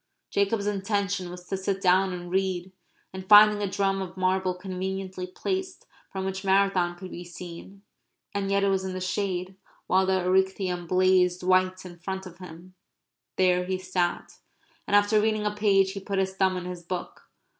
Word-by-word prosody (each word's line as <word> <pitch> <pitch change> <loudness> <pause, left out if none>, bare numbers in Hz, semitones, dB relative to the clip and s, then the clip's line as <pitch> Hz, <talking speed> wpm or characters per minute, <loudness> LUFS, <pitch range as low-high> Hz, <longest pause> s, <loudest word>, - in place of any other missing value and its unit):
Jacob's 200 +1 +1
intention 200 -2 -1
was 180 0 -10
to 195 - -2
sit 190 0 -2
down 190 0 +3
and 175 -1 -7
read, 190 -1 -1 0.4
and, 190 0 -8
finding 210 0 +8
a 200 - -1
drum 195 0 0
of 185 0 -7
marble 185 0 +1
conveniently 185 0 -5
placed, 375 - -4 0.3
from 190 -1 -4
which 190 0 -4
Marathon 190 -3 +2
could 185 +1 -9
be 175 - -7
seen, 175 +3 -10 0.5
and 200 -1 -2
yet 200 0 +2
it 200 - +3
was 190 -1 +1
in 190 -1 -4
the 185 - -4
shade, 185 0 -2 0.3
while 190 0 +2
the 190 0 +2
Erechtheum 185 -1 0
blazed 185 0 +3
white 185 0 +2
in 175 -1 -11
front 190 +2 -5
of 180 -1 -12
him, 180 0 -12 0.6
there 180 -1 +3
he 185 0 -1
sat. 185 -1 -2 0.5
And - - +2
after 205 +1 +4
reading 215 -1 0
a 210 - +1
page 195 -2 +3
he 195 - -6
put 195 0 -4
his 190 0 0
thumb 190 -1 +1
in 180 - -5
his 180 -1 -6
book. 175 +1 -7
190 Hz, 180 wpm, -26 LUFS, 180-195 Hz, 0.6 s, finding